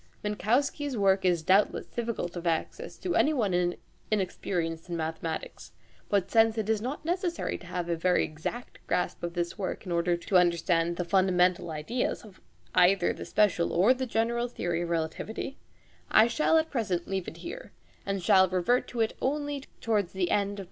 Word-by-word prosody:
Minkowski's 255 +6 0
work 195 -1 +3
is 175 -3 +2
doubtless 195 +5 +3
difficult 230 -7 -4
of 175 0 -4
access 165 -1 -2
to 365 - -2
anyone 190 - +2 0.3
inexperienced 175 -4 -2
in 170 - -2
mathematics, 160 0 -5 0.4
but 195 -2 +1
since 225 0 +4
it 215 -2 -1
is 215 -2 0
not 265 +6 -5
necessary 350 0 -1
to 180 - -13
have 175 -1 -3
a 170 - 0
very 180 +2 +2
exact 160 +11 -6
grasp 180 - -1
of 170 0 -4
this 175 +4 -3
work 190 +2 -4
in 180 - -5
order 170 0 +1
to 185 +2 +1
understand 170 -1 +2
the 180 - -2
fundamental 180 -1 +2
ideas 160 +15 -2
of 200 -3 -16 0.3
either 180 0 +4
the - - -8
special 200 -5 +2
or 195 +9 +5
the 260 0 -4
general 235 +1 0
theory 175 -8 -2
of 170 - -3
relativity, 170 - -3 0.5
I 220 - +6
shall 305 +7 +2
leave 320 - +5 0.6
it - - -7
here 465 +9 -8 0.4
at 195 - 0
present, 185 0 -5
and 190 -1 +4
revert 185 +7 +1
to 240 - -3
it 225 - 0
only 290 0 -2 0.2
towards 210 -5 0
the 190 -2 -1
end 200 -1 +2
of 200 - -6
Part - - -13
2. - - -6
190 Hz, 180 wpm, -28 LUFS, 175-230 Hz, 0.6 s, I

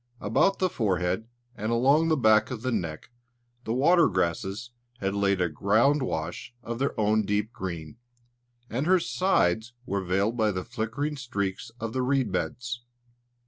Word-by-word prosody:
About 155 - +2
the 185 - +2
forehead 95 - -1 0.3
and 110 +1 -3
along 140 +7 +4
the 160 -1 +2
back 110 -3 +4
of 120 -3 -6
the 130 - 0
neck, 85 -4 -3 0.5
the 110 - -1
water 170 +7 +5
grasses 95 +5 -2 0.3
had 100 -4 -2
laid 100 -1 +1
a 90 - +2
ground 110 - +2
wash 85 +1 -4
of 115 +1 -5
their 135 -3 -1
own 110 +1 +3
deep 105 +3 -1
green; 90 -5 -6 0.7
and 130 +7 -2
her 185 0 +5
sides 120 - +1
were 100 -4 -2
veiled 100 +5 +1
by 110 -2 +2
the 95 -3 -3
flickering 125 +6 -3
streaks 115 -4 -3
of 115 -1 -4
the 130 - 0
reed 130 -4 +1
beds. 120 +2 -3
110 Hz, 160 wpm, -27 LUFS, 100-130 Hz, 0.7 s, water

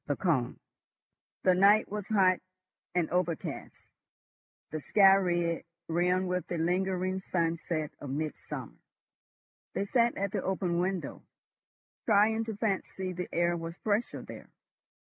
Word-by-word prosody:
THE 145 - +1
CONE 140 -10 0 0.8
The 185 - +5
night 200 +4 +5
was 210 -2 -4
hot 190 -4 +4 0.6
and 175 -3 +2
overcast, 175 -2 -3 0.9
the 155 - -3
sky 195 +5 +6
red, 175 -3 +1 0.2
rimmed 180 +3 +1
with 180 0 -2
the 175 - -3
lingering 185 +2 0
sunset 165 -3 -1
of 145 - -7
mid 150 +3 -2
summer. - - -8 1.0
They 200 - 0
sat 235 +2 +2
at 200 0 -1
the - - -1
open 180 -2 -1
window, 185 0 -2 0.9
trying 220 +1 +4
to 220 -2 -4
fancy 190 -3 -2
the 180 0 -5
air 175 0 +2
was 165 0 -6
fresher 215 +2 0
there. - - -10
180 Hz, 130 wpm, -30 LUFS, 170-195 Hz, 1.0 s, sky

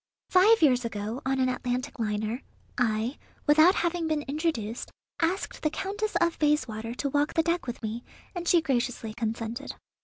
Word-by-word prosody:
Five 400 +3 +6
years 250 -4 +5
ago, 220 +2 -4
on 265 0 +1
an 260 - +3
Atlantic 250 0 -2
liner, 215 +2 -1 0.3
I, 230 +1 0 0.3
without 315 +5 +6
having 340 -1 0
been 310 -2 0
introduced, 275 -7 -2 0.3
asked 350 +4 -1
the 305 - +2
Countess 395 +5 -3
of 340 -1 +1
Bayswater 240 -7 0
to 280 - -1
walk 290 +2 +1
the 325 - +4
deck 340 -2 0
with 240 -1 -5
me, 225 +2 -3 0.3
and 350 -2 -5
she 340 -2 +5
graciously 245 -5 -1
consented. 230 +3 -4
270 Hz, 160 wpm, -28 LUFS, 230-330 Hz, 0.3 s, Five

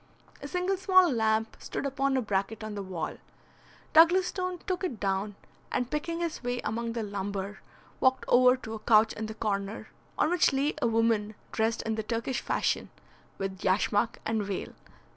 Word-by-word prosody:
A - - -5
single 365 +1 0
small 370 -2 +5
lamp 220 -2 +1
stood - - -4
upon 275 0 +1
a 255 - 0
bracket 205 +1 -2
on 215 -1 -5
the 205 - -4
wall. 180 -5 -4 0.8
Douglas 345 +4 +7
Stone 365 0 -3
took 370 -1 -2
it 255 - -3
down, 195 +1 -1 0.4
and 245 0 -1
picking 335 +3 -2
his 335 -2 -3
way 245 0 -1
among 230 +1 -2
the 230 -1 -2
lumber, 200 0 -4 0.4
walked 260 0 +3
over 250 +1 +6
to 225 -3 -8
a 220 - -5
couch 220 0 +4
in 220 0 -4
the 220 - -7
corner, 200 -1 -3 0.3
on 315 - +2
which 355 -5 +3
lay 280 +3 +1
a - - +3
woman 225 -2 +1 0.2
dressed 225 +1 0
in 220 - -1
the 220 - -1
Turkish 230 +3 -2
fashion, - - 0 0.5
with 195 -1 -4
yashmak 205 +4 +2
and 225 -1 0
veil. 195 -1 -4
225 Hz, 180 wpm, -29 LUFS, 210-275 Hz, 0.8 s, Douglas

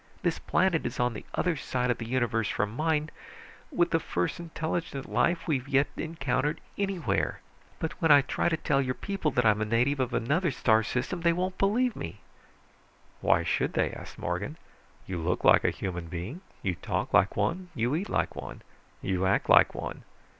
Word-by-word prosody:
This 175 -2 0
planet 180 -3 +2
is 120 - -4
on 120 -1 +2
the 105 - -7
other 180 -2 +1
side 125 -3 -1
of 120 - -2
the 115 - -5
universe 115 -3 0
from 105 +2 -1
mine, 155 +1 0 0.6
with 175 0 +2
the 165 - +3
first 90 - -2
intelligent 165 -3 -3
life 170 +1 +1
we've 135 -5 0
yet 140 0 +3
encountered 150 -1 -1 0.2
anywhere. 180 - -1 0.4
But 160 - -2
when 165 - +3
I 145 -1 +9
try - - 0
to 160 - 0
tell 140 -3 +1
your 130 -1 -1
people 195 -6 -2
that 125 -4 +1
I'm 105 -1 +4
a - - +1
native 120 +6 +1
of 130 -1 0
another 155 - +1
star 110 -5 +3
system, 125 - -2
they 170 0 +4
won't 185 +2 -2
believe 230 +5 +2
me!" 80 - -7 1.0
"Why - - +3
should - - 0
they?" - - +1
asked - - -10
Morgan. - - -3 0.5
"You 90 -2 -4
look 85 +2 -1
like - - +6
a - - +4
human 90 -3 -4
being. 90 - -6 0.2
You 95 - +1
talk - - -3
like - - +4
one. 180 +1 -1
You 120 +1 0
eat 180 +7 -1
like - - 0
one. - - -8 0.4
You 95 0 0
act 95 - +1
like - - +6
one. - - -5
140 Hz, 190 wpm, -28 LUFS, 115-170 Hz, 1.0 s, I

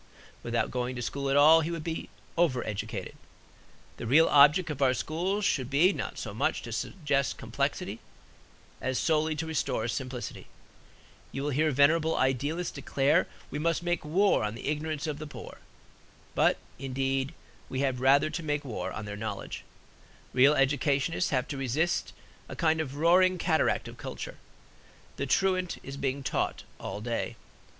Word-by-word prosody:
Without 115 0 -1
going 125 0 -2
to 125 - -4
school 140 +3 -2
at 135 - +3
all, 155 +3 +8
he 160 - -2
would 165 -2 -4
be 165 0 -4 0.3
over 160 -8 +2
educated. 105 -2 -4 0.8
The - - -5
real 155 +7 +6
object 150 +4 +6
of 145 -2 -6
our 130 -2 +4
schools 185 +9 -1
should 130 -10 +1
be 160 +8 +4
not - - -5
so - - -5
much - - 0
to - - -7
suggest 145 -6 -1
complexity - - -2 0.8
as 130 -1 -1
solely 155 -1 +1
to 155 +2 -3
restore 160 -6 -1
simplicity. 125 0 -5 0.8
You 135 - -4
will 145 - 0
hear 155 +3 +2
venerable 155 +3 +3
idealists 145 +7 0
declare 140 +3 +2 0.2
we 145 - -3
must 165 +2 0
make 175 0 -1
war 185 - +3
on 105 +1 -2
the 120 - -8
ignorance 155 0 -2
of 150 -2 -3
the 155 - -6
poor; - - -10 0.7
but, - - +3 0.2
indeed, 135 0 -1 0.3
we 130 - -2
have 130 -3 0
rather 140 +3 +4
to 170 - -3
make 145 -2 -2
war 120 -5 -4
on 105 - -5
their 105 0 -5
knowledge. 105 -2 -5 0.7
Real 135 +4 +6
educationists 140 +4 +1
have 130 -2 0
to 145 - -4
resist 140 +7 0 0.4
a - - -6
kind 160 -2 +2
of 140 -3 -5
roaring 180 +4 +4
cataract 160 -2 +1
of - - -10
culture. - - -7 0.8
The 140 - -2
truant 185 +4 +1
is 135 - -7
being 140 0 -2
taught 130 - -1 0.2
all 105 - -5
day. 115 +1 -2
145 Hz, 165 wpm, -29 LUFS, 130-160 Hz, 0.8 s, all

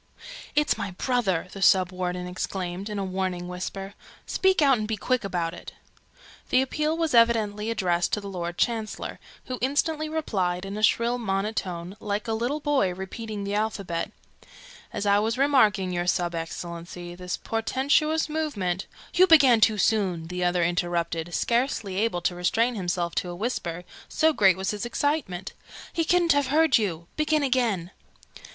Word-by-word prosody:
"It's 300 -5 +2
my 200 -1 -2
brother!" 190 -3 0
the 195 - -8
Sub 185 -2 +5
warden 180 -1 -3
exclaimed, 180 +1 -4
in 210 - -4
a 195 - -1
warning 185 -1 -2
whisper. 195 +2 -5 0.3
"Speak 380 0 +2
out, 275 -5 +5
and 215 - -2
be 220 -1 -2
quick 255 +4 0
about 175 -4 -2
it!" 175 - -10 0.8
The 255 - +4
appeal 305 +4 -1
was 325 -4 0
evidently 225 -2 +3
addressed 180 -6 0
to - - +2
the 200 - -8
Lord 175 -2 -4
Chancellor, 225 -2 -2 0.3
who 255 -1 -5
instantly 305 +4 0
replied, 190 - -1
in 195 +1 -5
a 215 - -4
shrill 235 +3 +2
monotone, 195 -4 -2
like 210 +1 -3
a 225 - 0
little 240 +7 -1
boy 285 -10 +1
repeating 205 +2 -6
the 200 0 -3
alphabet, 205 -5 -2 0.8
"As 200 - -3
I 200 0 +4
was 220 +3 0
remarking, 220 -9 +3
your 175 0 -2
Sub 175 -1 +1
Excellency, 170 +1 -6
this 180 0 -4
portentous 285 +7 +1
movement 210 - -2
" - - -20
"You 370 +2 +6
began 275 -9 +7
too 215 -1 +4
soon!" 185 -6 +1
the 180 0 -3
other 175 0 +2
interrupted, 170 -1 -1
scarcely 235 -5 0
able 205 -4 0
to 180 - 0
restrain 225 +8 +1
himself 175 -4 -2
to 180 - 0
a 175 - -5
whisper, 180 -5 -3 0.3
so 320 0 +3
great 190 - +4
was 190 0 -1
his 210 -1 -4
excitement. 240 - -2 0.4
"He 330 - +1
couldn't 345 0 +3
have 285 -2 +1
heard 305 -2 +4
you. 170 -6 -2
Begin 305 -1 +2
again!" 235 -10 0
205 Hz, 165 wpm, -26 LUFS, 180-250 Hz, 0.8 s, began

